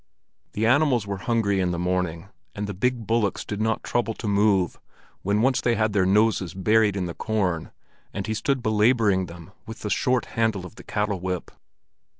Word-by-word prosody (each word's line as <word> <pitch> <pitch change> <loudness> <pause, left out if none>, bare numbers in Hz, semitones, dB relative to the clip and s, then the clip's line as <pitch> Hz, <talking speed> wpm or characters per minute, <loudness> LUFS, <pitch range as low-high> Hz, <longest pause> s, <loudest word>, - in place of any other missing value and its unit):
The 110 - 0
animals 130 -2 +3
were 100 -1 -4
hungry 105 -4 +2
in 90 -1 +1
the 90 - -2
morning, 90 0 -2 0.3
and 105 - -3
the 100 - -4
big 120 +4 -1
bullocks 115 -2 0
did 105 0 -4
not 110 0 0
trouble 115 -2 -1
to 110 - -5
move 100 -3 +2 0.4
when 100 +3 +1
once 130 0 +2
they 120 -1 +2
had 110 -2 +1
their 95 -3 +3
noses 100 -3 +2
buried 105 +1 +3
in 95 -2 -1
the 85 - -4
corn 95 -7 -1 0.4
and 100 0 -4
he 110 - -2
stood 130 +3 -1
belaboring 110 -4 +3
them 85 +2 -11 0.2
with 110 0 -8
the 105 - -3
short 125 -1 +1
handle 110 -5 0
of 90 - -10
the - - -13
cattle 105 -3 -1
whip. 90 -1 -4
105 Hz, 190 wpm, -25 LUFS, 95-115 Hz, 0.4 s, animals